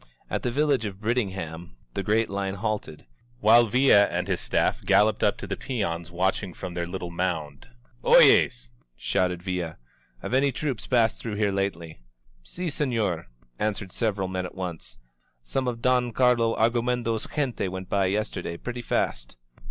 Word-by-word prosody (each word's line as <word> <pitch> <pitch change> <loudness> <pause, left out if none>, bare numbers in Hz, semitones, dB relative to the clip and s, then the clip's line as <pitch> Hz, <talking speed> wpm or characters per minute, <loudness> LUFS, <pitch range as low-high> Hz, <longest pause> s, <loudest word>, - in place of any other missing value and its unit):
At - - -1
the - - -1
village 140 -1 +1
of 100 -2 -6
Brit 115 +4 0
tingham 85 - -4 0.2
the - - -2
great 110 +3 +2
line 100 0 -3
halted, 105 -7 -4 0.3
while 115 +2 +6
Villa 115 -3 +5
and - - -2
his - - 0
staff - - 0
galloped 105 0 +3
up - - +3
to - - -6
the - - -3
peons 85 -10 -3
watching 90 +1 -1
from 90 - -6
their 85 0 -3
little 90 -1 -5
moimd. 80 -6 -3 0.4
OyezV* - - +5 0.3
said 90 +5 -1
Villa, 90 -4 -3 0.5
Have - - -4
any 135 +2 +3
troops 130 -4 -3
passed 115 -3 +2
through 110 -3 -4
here 105 -1 +1
lately?'* 85 -7 -3 0.4
"iSt, 175 - -5
senorT' 110 - -1 0.3
answered 105 -3 -2
several 100 -4 -1
men 90 0 -3
at - - -14
once. 85 -10 -6 0.5
Some 130 - -2
of 115 -1 -3
Don 125 -2 +2
Carlo 120 -2 +3
Argumedo's 115 0 0
gente 135 -9 -1
went 95 0 -6
by 100 0 +1
yesterday 95 -4 -2
pretty 125 +4 -5
fast." - - -2
100 Hz, 160 wpm, -26 LUFS, 90-120 Hz, 0.5 s, while